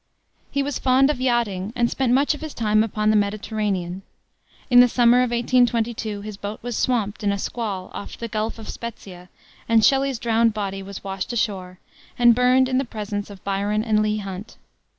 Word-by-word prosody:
He 280 Hz, -, -1 dB
was 285 Hz, -1 st, -3 dB
fond 265 Hz, +2 st, +4 dB
of 260 Hz, -4 st, -5 dB
yachting, 230 Hz, -5 st, 0 dB
and 240 Hz, -1 st, +2 dB
spent 255 Hz, 0 st, 0 dB
much 275 Hz, +4 st, +3 dB
of 295 Hz, -, -9 dB
his 315 Hz, -2 st, -7 dB
time 215 Hz, -1 st, +2 dB
upon 215 Hz, -1 st, 0 dB
the -, -, +2 dB
Mediterranean. 200 Hz, -3 st, -1 dB, 0.7 s
In 245 Hz, -, +8 dB
the 245 Hz, -, +8 dB
summer 240 Hz, 0 st, +4 dB
of 250 Hz, -1 st, +2 dB
1822, 235 Hz, -3 st, 0 dB
his 210 Hz, -1 st, -7 dB
boat 205 Hz, +1 st, -5 dB
was 245 Hz, -1 st, -4 dB
swamped 220 Hz, -5 st, -1 dB
in 200 Hz, -, +2 dB
a 200 Hz, -, -1 dB
squall 200 Hz, -3 st, -4 dB
off -, -, -7 dB
the 230 Hz, -, -5 dB
Gulf 220 Hz, +1 st, -3 dB
of 220 Hz, -, -10 dB
Spezzia, 185 Hz, -6 st, -8 dB, 0.4 s
and 225 Hz, -1 st, +5 dB
Shelley's 270 Hz, -1 st, +2 dB
drowned 230 Hz, -1 st, +2 dB
body 195 Hz, -2 st, -3 dB
was 195 Hz, 0 st, -9 dB
washed 195 Hz, +3 st, -4 dB
ashore, 190 Hz, -5 st, -2 dB, 0.4 s
and 240 Hz, -1 st, +6 dB
burned 250 Hz, +2 st, +4 dB
in 260 Hz, 0 st, +1 dB
the -, -, 0 dB
presence 210 Hz, -4 st, -5 dB
of 200 Hz, -2 st, -12 dB
Byron 200 Hz, +2 st, -1 dB
and 215 Hz, -2 st, +2 dB
Leigh 215 Hz, 0 st, 0 dB
Hunt. 195 Hz, 0 st, -7 dB
220 Hz, 190 wpm, -22 LUFS, 200-245 Hz, 0.7 s, In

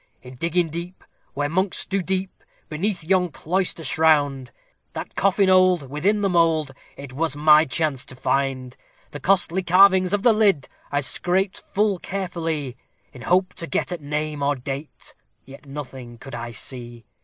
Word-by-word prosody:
"In 125 Hz, 0 st, -11 dB
digging 170 Hz, +4 st, 0 dB
deep, 170 Hz, +3 st, -7 dB, 0.3 s
where 145 Hz, +1 st, 0 dB
monks 185 Hz, +5 st, -1 dB
do 195 Hz, 0 st, -1 dB
sleep, 190 Hz, +1 st, -3 dB, 0.3 s
beneath 180 Hz, +3 st, -2 dB
yon 180 Hz, +1 st, +2 dB
cloister 175 Hz, +2 st, -2 dB
shrined, 145 Hz, -3 st, +2 dB, 0.4 s
That -, -, -6 dB
coffin 195 Hz, 0 st, +2 dB
old, 185 Hz, -7 st, +4 dB
within 195 Hz, +8 st, +1 dB
the 200 Hz, -, +2 dB
mould, 165 Hz, -5 st, +2 dB, 0.3 s
it 140 Hz, -1 st, -9 dB
was 155 Hz, 0 st, -1 dB
my 155 Hz, +1 st, +6 dB
chance 140 Hz, -2 st, -1 dB
to 130 Hz, -, -11 dB
find; 130 Hz, -1 st, -1 dB, 0.4 s
The -, -, -7 dB
costly 190 Hz, -1 st, +2 dB
carvings 185 Hz, +1 st, +5 dB
of 205 Hz, 0 st, 0 dB
the 235 Hz, -, +6 dB
lid 200 Hz, -10 st, +2 dB, 0.2 s
I 145 Hz, 0 st, +1 dB
scraped 185 Hz, +7 st, +1 dB
full 205 Hz, -2 st, 0 dB
carefully, 165 Hz, -9 st, -4 dB, 0.4 s
In 125 Hz, -, -12 dB
hope 185 Hz, +7 st, +1 dB
to 170 Hz, -, -5 dB
get -, -, -1 dB
at 175 Hz, -3 st, -4 dB
name 150 Hz, 0 st, -3 dB
or 145 Hz, +1 st, +1 dB
date, 135 Hz, +3 st, -7 dB, 0.3 s
yet 140 Hz, +2 st, -14 dB
nothing 130 Hz, -4 st, -8 dB
could 135 Hz, +2 st, -11 dB
I 120 Hz, 0 st, -5 dB
see. 120 Hz, 0 st, -6 dB
160 Hz, 160 wpm, -23 LUFS, 135-185 Hz, 0.4 s, my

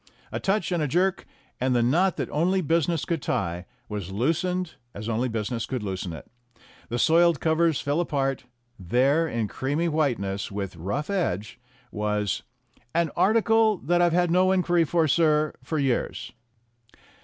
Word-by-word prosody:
A -, -, -3 dB
touch 195 Hz, 0 st, 0 dB
and 175 Hz, -2 st, 0 dB
a 150 Hz, -, +1 dB
jerk, 185 Hz, +6 st, 0 dB, 0.3 s
and 130 Hz, 0 st, +1 dB
the 120 Hz, -, +3 dB
knot 170 Hz, +9 st, +2 dB
that -, -, -2 dB
only 180 Hz, +5 st, +1 dB
business 165 Hz, -1 st, +1 dB
could 165 Hz, -4 st, -2 dB
tie 90 Hz, -5 st, -2 dB, 0.2 s
was 100 Hz, -3 st, -5 dB
loosened 165 Hz, -, -1 dB, 0.2 s
as 105 Hz, +2 st, -6 dB
only 115 Hz, +3 st, 0 dB
business 115 Hz, +1 st, -3 dB
could 130 Hz, -4 st, -3 dB
loosen 95 Hz, -3 st, -4 dB
it. 80 Hz, -, -9 dB, 0.6 s
The 120 Hz, -, -2 dB
soiled 165 Hz, +2 st, +4 dB
covers 160 Hz, -1 st, +2 dB
fell 145 Hz, +3 st, 0 dB
apart; 135 Hz, -6 st, -1 dB, 0.3 s
there, 135 Hz, -, +2 dB
in 115 Hz, -7 st, -2 dB
creamy 145 Hz, -, -1 dB
whiteness, 120 Hz, -13 st, -1 dB
with 100 Hz, -2 st, -4 dB
rough 100 Hz, -, -3 dB
edge, 110 Hz, -, -2 dB, 0.3 s
was 105 Hz, -1 st, -1 dB, 0.5 s
"an 170 Hz, -3 st, +2 dB
article 225 Hz, 0 st, +3 dB
that 175 Hz, +2 st, +1 dB
I've 175 Hz, -1 st, +4 dB
had 175 Hz, 0 st, +2 dB
no 185 Hz, +2 st, +4 dB
inquiry 175 Hz, -3 st, +2 dB
for, 165 Hz, 0 st, +2 dB
sir, 155 Hz, -1 st, +2 dB
for 160 Hz, -, -3 dB
years." 135 Hz, -3 st, -1 dB
150 Hz, 155 wpm, -25 LUFS, 115-170 Hz, 0.6 s, soiled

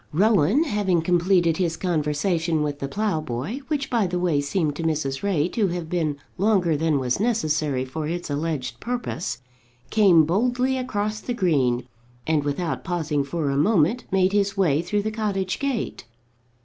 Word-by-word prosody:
Rowan, 205 Hz, -, +3 dB
having 200 Hz, -, 0 dB
completed 175 Hz, -1 st, +2 dB
his 170 Hz, -3 st, 0 dB
conversation 160 Hz, -1 st, 0 dB
with 145 Hz, -1 st, -3 dB
the 140 Hz, -, -3 dB
ploughboy, 160 Hz, -, -2 dB
which 295 Hz, -3 st, -1 dB
by 230 Hz, -5 st, +2 dB
the 180 Hz, 0 st, -2 dB
way 170 Hz, -5 st, +1 dB
seemed 150 Hz, 0 st, -1 dB
to -, -, -4 dB
Mrs. 150 Hz, -4 st, -1 dB
Ray 180 Hz, -6 st, +1 dB
to 215 Hz, -2 st, +1 dB
have 170 Hz, -2 st, -4 dB
been 160 Hz, -5 st, 0 dB, 0.2 s
longer 190 Hz, -5 st, +3 dB
than 155 Hz, 0 st, +1 dB
was 125 Hz, +1 st, -1 dB
necessary 155 Hz, -, 0 dB
for 150 Hz, +4 st, -4 dB
its 175 Hz, +2 st, -3 dB
alleged 145 Hz, -4 st, -3 dB
purpose, 235 Hz, -, -4 dB, 0.5 s
came 185 Hz, -7 st, +5 dB
boldly 250 Hz, -, +1 dB
across 215 Hz, -5 st, -2 dB
the 245 Hz, +2 st, -4 dB
green, 130 Hz, -, +1 dB, 0.4 s
and 155 Hz, -2 st, +1 dB
without 150 Hz, +4 st, -2 dB
pausing 160 Hz, -5 st, -1 dB
for 145 Hz, 0 st, -2 dB
a -, -, -1 dB
moment 195 Hz, -, +2 dB
made 190 Hz, 0 st, +2 dB
his 200 Hz, -1 st, +1 dB
way 160 Hz, -6 st, +3 dB
through 205 Hz, +4 st, -1 dB
the 215 Hz, -, -2 dB
cottage 195 Hz, -4 st, -2 dB
gate. 275 Hz, -, -3 dB
175 Hz, 160 wpm, -24 LUFS, 150-205 Hz, 0.5 s, came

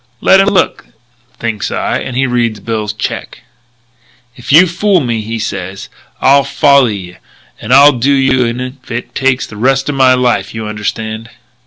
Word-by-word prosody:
'Let 190 Hz, -, +4 dB
him 195 Hz, -, +3 dB
look,' 195 Hz, -2 st, 0 dB, 0.5 s
thinks 110 Hz, -4 st, -3 dB
I; -, -, -2 dB
and 125 Hz, -, -5 dB
he 135 Hz, -, +2 dB
reads 120 Hz, -4 st, -1 dB
Bill's 110 Hz, 0 st, -3 dB
check. 105 Hz, -, -6 dB, 0.9 s
"'If 125 Hz, -, -7 dB
you 160 Hz, +6 st, +7 dB
fool 185 Hz, +2 st, +1 dB
me,' 115 Hz, -4 st, -3 dB
says 100 Hz, -3 st, -5 dB
he, -, -, -12 dB, 0.4 s
'I'll 140 Hz, +1 st, +5 dB
folly 140 Hz, -5 st, +3 dB
ye 90 Hz, -1 st, -10 dB, 0.4 s
and 110 Hz, -, -6 dB
I'll 140 Hz, +3 st, +7 dB
do 130 Hz, +1 st, 0 dB
you 130 Hz, -2 st, +2 dB
in 120 Hz, +1 st, -3 dB
if 130 Hz, +1 st, -8 dB
it 120 Hz, +1 st, -5 dB
takes 135 Hz, -1 st, 0 dB
the 105 Hz, -, -12 dB
rest 135 Hz, +5 st, +1 dB
of -, -, -1 dB
my 130 Hz, -1 st, +4 dB
life. 125 Hz, -2 st, -1 dB
You 110 Hz, -1 st, -5 dB
understand?' 110 Hz, +1 st, -5 dB
125 Hz, 175 wpm, -13 LUFS, 110-135 Hz, 0.9 s, you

